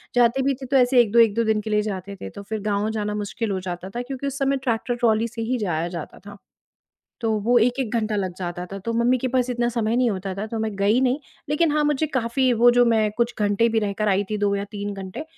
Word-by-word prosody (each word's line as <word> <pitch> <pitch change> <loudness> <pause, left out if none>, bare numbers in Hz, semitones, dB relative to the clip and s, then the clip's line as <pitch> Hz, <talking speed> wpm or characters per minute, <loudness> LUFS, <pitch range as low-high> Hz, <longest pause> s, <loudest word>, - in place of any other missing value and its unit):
जाते 245 +2 +4
भी 275 +1 +2
थे, 265 +1 -9
तो 270 +1 +2
ऐसे 250 0 +4
1-2, 235 0 +2
1-2 230 0 +4
दिन 220 -1 +1
के 215 - -6
लिए 210 0 +2
जाते 200 -2 -5
थे, - - -5
तो 200 - -10
फिर 220 +2 -4
गाँव 205 +1 0
जाना 210 -1 -2
मुश्किल 210 +1 -3
हो 190 - -1
जाता 180 +1 -6
था, 240 +5 -4
क्योंकि 265 +2 -5
उस 275 0 -4
समय 275 0 +1
ट्रैक्टर 240 -1 -1
ट्रॉली 230 -2 +2
से 230 0 -6
ही 255 - +1
जाया 170 -7 -1
जाता 155 - -8
था। 205 0 -10 0.8
तो 225 -2 0
वो 240 +2 +3
1-1 245 +1 +1
घंटा 215 -2 -1
लग 190 -3 -2
जाता 175 -1 -4
था, 195 +2 -7
तो 230 +4 -4
मम्मी 240 +2 +3
के 255 - -2
पास 255 0 +1
इतना 240 -1 0
समय 230 -1 0
नहीं 250 -1 +3
होता 190 -1 -4
था, 200 +3 -4
तो 225 +1 -4
मैं 220 0 -1
गई 205 +5 +3
नहीं। 260 +1 +2 0.3
लेकिन 300 +1 +2
हाँ, 300 0 +2
मुझे 295 +1 +1
काफ़ी 260 -1 +1
वो 240 +1 +6
जो 245 - +7
मैं 220 -2 +2
कुछ 235 0 0
घंटे 205 +2 +2
भी 225 - +1
रहकर 210 0 -1
आई 200 +1 +2
थी, 210 - -1
2 205 -1 +1
या 200 - -2
3 205 0 -4
घंटे, 195 +9 -7
225 Hz, 260 wpm, -23 LUFS, 205-245 Hz, 0.8 s, जो